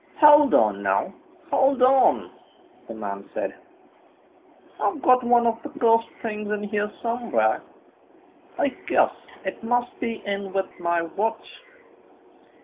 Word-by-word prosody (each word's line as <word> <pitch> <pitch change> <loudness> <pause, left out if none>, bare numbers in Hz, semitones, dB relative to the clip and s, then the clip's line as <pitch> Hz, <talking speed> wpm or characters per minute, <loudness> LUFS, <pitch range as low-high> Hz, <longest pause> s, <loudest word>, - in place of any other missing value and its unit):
"Hold 295 -2 +7
on, 105 -2 +2
now, 95 -1 0 0.4
hold 270 -1 +3
on!" 260 +1 +4 0.6
the 115 - -8
man 100 -2 -7
said, - - -3 1.3
"I've 335 - -1
got 255 -1 +4
one 240 0 +3
of 230 0 0
the - - -8
cursed 230 -1 +3
things 210 -2 -4
in 210 -1 -2
here 210 0 -2
somewhere. 235 0 0 1.0
I 285 - +1 0.2
guess - - +3 0.3
it - - -5
must 245 +1 -1
be 230 -2 -4
in 200 -1 -4
with 195 -1 -2
my 170 -1 0
watch. 205 - -4
225 Hz, 130 wpm, -24 LUFS, 195-245 Hz, 1.3 s, Hold